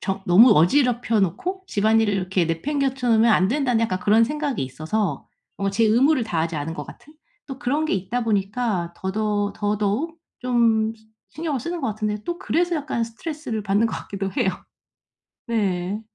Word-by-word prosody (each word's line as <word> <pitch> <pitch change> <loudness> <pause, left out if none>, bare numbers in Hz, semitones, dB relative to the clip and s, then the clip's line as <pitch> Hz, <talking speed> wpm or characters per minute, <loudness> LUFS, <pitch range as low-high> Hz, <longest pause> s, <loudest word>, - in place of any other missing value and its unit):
정 195 0 -3
'너무 210 +8 +7
어지럽혀 235 - +3
놓고 360 - -2
집안일을 215 0 +2
이렇게 185 -2 0
내팽개쳐 265 - -1
놓으면 225 +1 +5
안 190 -2 +4
된다.'는 250 -3 +1
약간 185 -5 -1
그런 220 +4 +4
생각이 290 - -2
있어서 155 +5 -3 0.3
뭔가 195 0 0
제 225 +3 +2
의무를 250 +4 +3
다하지 165 -4 -2
않은 150 +3 -3
것 150 -3 -6
같은 300 - -14 0.3
또 270 -2 -7
그런 280 +6 0
게 - - -1
있다 225 +6 -2
보니까 200 -4 -1
더더 205 +1 -1
더더욱 210 +10 -1 0.2
좀 230 -3 +2
시 220 -1 -25 0.3
신경을 310 -5 -1
쓰는 340 +6 -4
것 265 - -1
같은데 210 0 -3
또 345 0 -3
그래서 345 -2 0
약간 285 -5 -2
스트레스를 240 0 -5
받는 205 +3 +2
것 - - -4
같기도 195 -1 -5
해요. 190 - +1 1.0
네. 200 -3 -1
220 Hz, 355 characters per minute, -23 LUFS, 195-255 Hz, 1.0 s, 너무